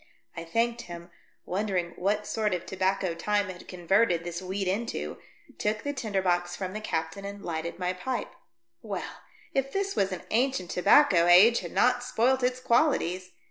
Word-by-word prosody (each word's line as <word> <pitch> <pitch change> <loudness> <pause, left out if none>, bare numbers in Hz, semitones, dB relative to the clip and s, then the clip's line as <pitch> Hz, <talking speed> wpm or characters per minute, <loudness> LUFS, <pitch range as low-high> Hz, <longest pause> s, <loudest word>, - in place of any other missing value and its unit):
I 165 - -5
thanked 230 +7 0
him, 170 0 -9 0.3
wondering 185 -3 -1
what 205 +3 0
sort 210 -4 0
of 175 - -6
tobacco 190 -1 0
time 205 +4 0
had 180 -1 -9
converted 180 0 +2
this 175 +1 -5
weed 190 +1 -3
into, 220 +6 -3 0.4
took 210 0 -1
the 285 - -2
tinder 205 -8 -2
box 175 -1 0
from 185 -1 -5
the 215 - -5
captain 160 -1 -3
and 200 0 -7
lighted 165 0 -4
my 180 0 -1
pipe. 250 +8 -4 0.5
Well, - - -6 0.3
if 270 0 0
this 395 +3 -1
was 195 0 +1
an 185 - -5
ancient 240 -6 +1
tobacco 180 - +5
age 200 +7 +7
had - - -7
not 250 0 +3
spoilt 250 +2 +2
its 250 0 0
qualities. 185 - +1
195 Hz, 170 wpm, -28 LUFS, 180-230 Hz, 0.5 s, age